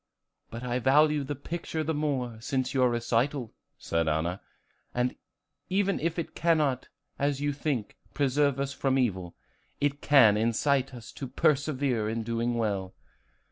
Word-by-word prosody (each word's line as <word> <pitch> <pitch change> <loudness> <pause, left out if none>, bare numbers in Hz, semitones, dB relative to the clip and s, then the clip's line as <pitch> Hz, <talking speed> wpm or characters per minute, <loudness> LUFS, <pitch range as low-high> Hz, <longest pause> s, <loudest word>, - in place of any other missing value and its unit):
"But 115 +2 -7
I 125 0 -1
value 150 +3 +4
the 145 +2 -4
picture 160 +2 -4
the 160 +1 -1
more 135 -6 -1
since 130 +1 -1
your 130 -2 +4
recital," 120 +2 0 0.2
said 85 -1 -1
Anna. 80 +4 -1 1.3
"Even 195 +1 +1
if 165 +1 -1
it 170 - -4
cannot, 155 -6 +1 0.3
as 140 -1 +1
you 145 0 0
think, 140 -6 -3 0.2
preserve 140 -1 +2
us 140 0 -2
from 135 -1 +1
evil, 95 -9 -1 0.4
it 145 0 0
can 120 -8 +6
incite 130 +4 +1
us 115 -3 -10
to 135 - -6
persevere 135 -5 +1
in 115 0 -2
doing 115 +1 -1
well." 100 -5 -2
135 Hz, 140 wpm, -28 LUFS, 115-145 Hz, 1.3 s, can